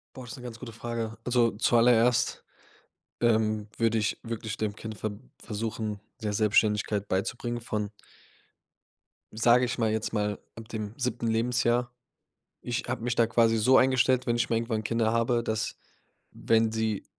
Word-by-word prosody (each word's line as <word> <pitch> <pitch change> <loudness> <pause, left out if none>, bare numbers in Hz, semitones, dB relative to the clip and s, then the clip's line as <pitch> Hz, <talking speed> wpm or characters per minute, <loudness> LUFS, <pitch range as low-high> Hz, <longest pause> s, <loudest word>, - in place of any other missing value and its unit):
Boah, 130 - -8
ist 120 - -8
'ne 125 - -11
ganz 120 -2 -8
gute 115 -1 -8
Frage. 115 -1 -4
Also 120 -2 +3
zuallererst, 120 +2 +3 0.8
ähm, 110 -2 +2
würde 115 -1 +2
ich 105 - -1
wirklich 115 -2 -5
dem 105 -2 -2
Kind 110 -1 -7
ver 110 - -3 0.3
versuchen, 110 -1 -3 0.2
mehr 105 -1 -1
Selbstständigkeit 105 -1 +2
beizubringen 120 +5 -2
von 105 -3 -3 1.4
sage 120 +3 +4
ich 125 +1 -3
mal 110 -2 +2
jetzt 110 0 -2
mal 105 -1 -1 0.2
ab 115 0 -10
dem 110 -3 -5
7. 125 -2 -2
Lebensjahr. 120 +1 +1 0.7
Ich 120 0 -2
habe 125 -2 -3
mich 125 -1 0
da 115 -2 +3
quasi 115 0 +3
so 130 +5 +5
eingestellt, 130 -1 +3
wenn 120 - +2
ich 120 - 0
mal 115 - +2
irgendwann 115 -1 -1
Kinder 115 0 +1
habe, 115 0 +1
dass, 110 0 -2 0.6
wenn 110 -1 +2
sie 110 -2 -1
115 Hz, 155 wpm, -28 LUFS, 110-120 Hz, 1.4 s, so